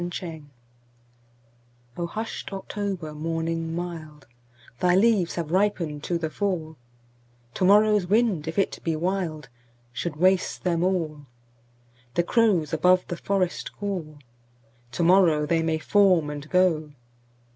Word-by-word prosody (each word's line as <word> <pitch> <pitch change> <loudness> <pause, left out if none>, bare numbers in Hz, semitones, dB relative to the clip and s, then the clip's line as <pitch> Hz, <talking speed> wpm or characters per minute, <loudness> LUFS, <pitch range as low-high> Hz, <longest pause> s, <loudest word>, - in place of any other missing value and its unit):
30. 175 - -2
October 165 -4 -7 1.5
O 170 - -2
HUSHED 220 +1 -6
October 195 -5 -4
morning 165 +1 -3
mild, 160 -5 -7 0.5
Thy 180 0 +3
leaves 200 -3 +3
have 165 -3 -4
ripened 175 -6 0
to 175 - 0
the 160 -2 -4
fall; 170 -6 -2 0.8
To 185 - 0
morrow's 210 -1 +4
wind, 205 -6 +1
if 160 - -5
it 195 - 0
be 165 -1 0
wild, 165 -4 -2 0.5
Should 150 +5 -4
waste 185 +3 +1
them 170 -2 +1
all. 160 -6 -2 0.9
The 175 - +3
crows 185 -7 +2
above 180 +3 +3
the 175 - -3
forest 185 -1 -2
call; 180 -7 -4 0.8
To 170 - -1
morrow 165 -4 +4
they 165 +2 +1
may 160 -1 0
form 180 -2 +3
and 145 +1 -8
go. 165 -5 +2
175 Hz, 130 wpm, -25 LUFS, 155-190 Hz, 1.5 s, morrow's